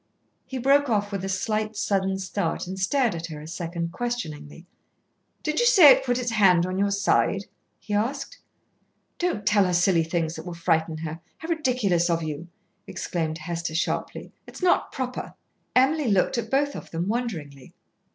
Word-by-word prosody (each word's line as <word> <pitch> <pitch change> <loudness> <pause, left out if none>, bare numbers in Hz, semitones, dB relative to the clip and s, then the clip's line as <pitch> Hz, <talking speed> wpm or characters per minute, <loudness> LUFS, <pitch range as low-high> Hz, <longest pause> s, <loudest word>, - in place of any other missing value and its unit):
He 265 - -5
broke 275 +2 +3
off 205 -2 0
with 195 -2 -3
a 195 - -3
slight 215 +2 -1
sudden 195 -2 0
start 190 -2 -2
and 190 +1 -6
stared 240 +4 +2
at 165 0 -5
her 155 -2 -8
a 150 - -10
second 170 0 -4
questioningly. 170 -10 -5 0.8
"Did 305 0 0
you 480 - +4
say 360 - +9
it - - +4
put 245 -2 0
its 245 -2 -2
hand 185 -6 +4
on 185 +1 -3
your 200 0 +2
side?" 200 0 +1 0.3
he 210 - -6
asked. 275 - -2 0.8
"Don't 345 - -1
tell 205 -2 +4
her 180 - 0
silly 175 -1 +3
things 165 -1 -1
that 160 - -7
will 175 - -5
frighten 165 -1 0
her. 160 0 -5 0.2
How 320 - -8
ridiculous 245 - +1
of 165 -1 +1
you," 155 +2 -5 0.4
exclaimed 160 -2 -3
Hester 165 0 -4
sharply. 170 - -2 0.2
"It's - - -10
not 360 - +3
proper." 255 -1 -5 0.4
Emily 275 +3 +3
looked 200 +3 +2
at - - -5
both 285 +1 +1
of - - -8
them 170 +2 -3
wonderingly. 165 - -4
195 Hz, 175 wpm, -25 LUFS, 170-245 Hz, 0.8 s, say